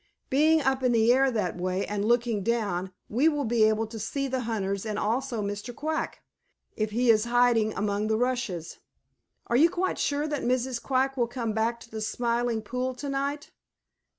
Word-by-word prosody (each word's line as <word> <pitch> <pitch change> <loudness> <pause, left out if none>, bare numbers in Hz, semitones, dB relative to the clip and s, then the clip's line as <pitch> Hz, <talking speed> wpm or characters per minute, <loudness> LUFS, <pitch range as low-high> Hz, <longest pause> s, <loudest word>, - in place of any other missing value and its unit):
Being 310 +3 +4
up 265 -1 +1
in 250 -1 +2
the 230 +1 +5
air 270 +1 +4
that 210 -8 -2
way 185 +2 -1
and 205 -1 -2
looking 235 -1 +1
down, 195 -4 -1 0.2
we 265 +9 +3
will 295 -2 -1
be 225 -1 +3
able 220 +1 +2
to 220 0 -8
see 275 +6 -2
the 260 0 -1
hunters 200 -5 -2
and 215 -2 -3
also 235 +1 -1
Mr. 205 +4 -5
Quack, 315 +4 -3 0.5
if 215 -2 -1
he 235 +2 +3
is 215 0 +3
hiding 235 -3 +3
among 205 +1 -1
the 220 0 +1
rushes. 235 -9 -2 0.7
Are 235 - -1
you 315 +7 +6
quite 365 +2 -1
sure 290 +1 0
that 295 -2 -2
Mrs. 250 0 0
Quack 270 0 0
will 240 -2 +2
come 230 -2 -3
back 225 +2 0
to 230 - -14
the 220 0 -5
Smiling 235 0 -1
Pool 250 +3 -3
to 280 +3 -5
night?" 280 +2 -3
235 Hz, 190 wpm, -27 LUFS, 215-260 Hz, 0.7 s, you